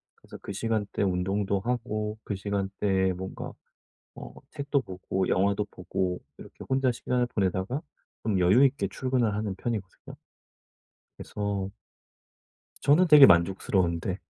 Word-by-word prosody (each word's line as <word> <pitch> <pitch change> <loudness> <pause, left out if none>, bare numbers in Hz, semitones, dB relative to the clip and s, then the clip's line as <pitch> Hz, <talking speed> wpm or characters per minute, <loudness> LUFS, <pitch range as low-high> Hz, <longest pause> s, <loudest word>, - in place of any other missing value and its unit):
그래서 - - -13
그 - - -7
시간대에 105 -1 -1
운동도 95 +2 0
하고 110 -3 -2
그 100 - -3
시간대에 95 -1 0
뭔가 95 +1 -7 0.6
어 - - -9 0.2
책도 140 -1 -1
보고 95 -2 -3
영화도 100 +2 +1
보고 90 0 -3 0.2
이렇게 - - -11
혼자 130 -1 +2
시간을 125 +1 -1
보내다가 100 +4 -1 0.4
좀 105 -4 +1
여유 95 +10 +5
있게 135 0 +1
출근을 125 -4 0
하는 105 -2 -2
편이거든요. 105 -5 -5 1.0
그래서 100 -2 -3 1.1
저는 155 +6 +4
되게 150 -3 +10
만족스러운데. 90 0 +2
100 Hz, 295 characters per minute, -27 LUFS, 95-120 Hz, 1.1 s, 되게